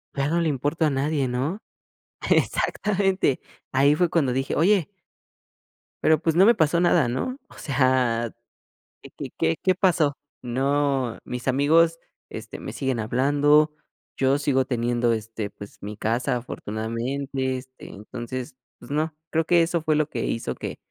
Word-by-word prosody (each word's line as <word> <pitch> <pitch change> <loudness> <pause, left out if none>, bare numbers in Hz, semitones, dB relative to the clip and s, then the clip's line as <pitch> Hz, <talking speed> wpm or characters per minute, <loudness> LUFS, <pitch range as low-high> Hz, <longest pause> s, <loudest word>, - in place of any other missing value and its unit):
"Ya 140 0 0
no 170 +2 +1
le 165 - +1
importo 145 +4 0
a 155 - +3
nadie", 140 0 0
¿no? 135 +10 -2 0.7
Exactamente, 195 -8 +1 0.3
ahí 140 +3 +4
fue 175 +2 +2
cuando 150 -7 +1
dije: 135 +1 -1
"oye" 185 +1 +3 1.1
Pero, 155 -1 +4
pues, 165 0 0
no 185 +3 +6
me 235 - +7
pasó 170 -4 +2
nada, 175 -6 +4
¿no? 130 - -2
O - - -18
sea, 130 -4 +1 0.7
¿qué - - -12
qué - - -5
qué 80 0 +1
qué 185 -1 +2
pasó? 170 -6 +2 0.3
No, 135 0 0
mis 125 +1 -3
amigos, 165 +5 +3 0.3
este, - - -8
me - - -6
siguen 130 -4 -2
hablando, 145 +6 +3 0.4
yo 135 +1 +2
sigo 140 -2 +1
teniendo, 120 -1 0
este, 110 -1 -3
pues 100 0 -12
mi 105 +1 -7
casa, 120 +4 0
afortunadamente, 125 +4 -3
este, 130 0 -12
entonces, 120 +4 -7 0.2
pues 120 - -12
no. 155 +1 0 0.2
Creo 165 0 +1
que 170 +1 +4
eso 170 0 0
fue 155 -1 +1
lo 155 -1 +1
que 120 -5 -3
hizo 115 - -2
que - - -6
140 Hz, 155 wpm, -24 LUFS, 125-160 Hz, 1.1 s, me